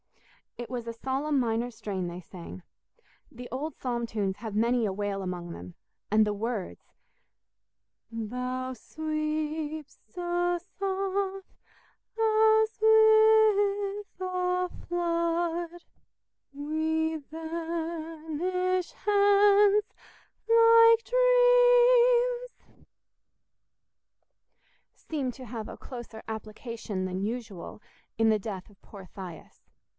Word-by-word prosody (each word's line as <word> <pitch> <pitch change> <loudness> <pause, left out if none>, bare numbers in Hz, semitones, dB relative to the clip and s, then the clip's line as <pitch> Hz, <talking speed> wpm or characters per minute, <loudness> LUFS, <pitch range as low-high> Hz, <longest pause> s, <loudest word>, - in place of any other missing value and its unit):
It 240 - -7
was 245 -2 -4
a 230 - -4
solemn 270 +4 -1
minor 235 0 0
strain 195 -5 -4
they 175 +1 -7
sang. 180 +1 -11 0.7
The 245 -2 -9
old 290 +5 -4
psalm 240 -2 -2
tunes 200 -4 -2
have 220 -2 -7
many 235 +2 +2
a 200 - -1
wail 200 0 -3
among 180 -2 -5
them, 90 - -10 0.3
and 215 +1 +4
the 210 - -1
words— 215 -1 -5 1.2
"Thou 250 +3 -4
sweep'st 310 +3 -4
us 350 0 -1 0.2
off 390 0 -2 0.7
as 440 0 +3
with 435 -3 +4
a 365 0 -1 0.2
flood; 340 0 -1 0.7
We 315 +2 -1
vanish 330 +3 -3
hence 410 0 +4 0.6
like 460 0 +7
dreams"— - - +3 2.1
seemed 275 -6 -4
to 260 - -10
have 225 -2 -6
a - - -9
closer 240 -3 -9
application 220 -2 -5
than 185 0 -3
usual 215 -4 -5 0.4
in 225 0 +3
the 215 -1 +3
death 200 -3 -7
of 205 - -23
poor 195 -3 -12
Thias. 180 -4 -11
315 Hz, 95 wpm, -28 LUFS, -, 2.1 s, like